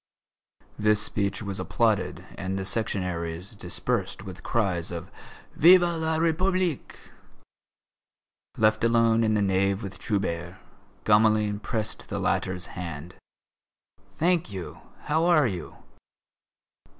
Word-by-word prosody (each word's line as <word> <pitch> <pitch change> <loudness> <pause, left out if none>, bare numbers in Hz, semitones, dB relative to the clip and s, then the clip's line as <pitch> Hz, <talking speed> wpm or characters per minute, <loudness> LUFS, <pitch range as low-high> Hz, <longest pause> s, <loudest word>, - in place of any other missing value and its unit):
This 105 0 +3
speech 100 -1 -1
was 100 -2 -4
applauded 110 -4 0
and 95 0 -3
the 95 - -2
Sectionaries 90 -3 -3
dispersed 90 0 -3
with 95 -1 -9
cries 95 -7 -1
of 85 +1 -7 0.4
"Vive 180 +3 +8
la 160 -2 0
République!" 175 0 0 1.6
Left 110 0 +3
alone 115 -1 +4
in 110 -1 +2
the 105 - +2
nave 95 +1 +1
with 95 -1 -7
Trubert, 85 -3 -2 0.5
Gamelin 105 -1 +3
pressed 110 0 -4
the - - -3
latter's 90 -1 -1
hand. 85 -1 -6 1.0
"Thank 170 - +1
you. 95 -3 -7 0.2
How 160 +2 +1
are 170 -5 +5
you?" 90 -8 -4
105 Hz, 110 wpm, -26 LUFS, 95-115 Hz, 1.6 s, Vive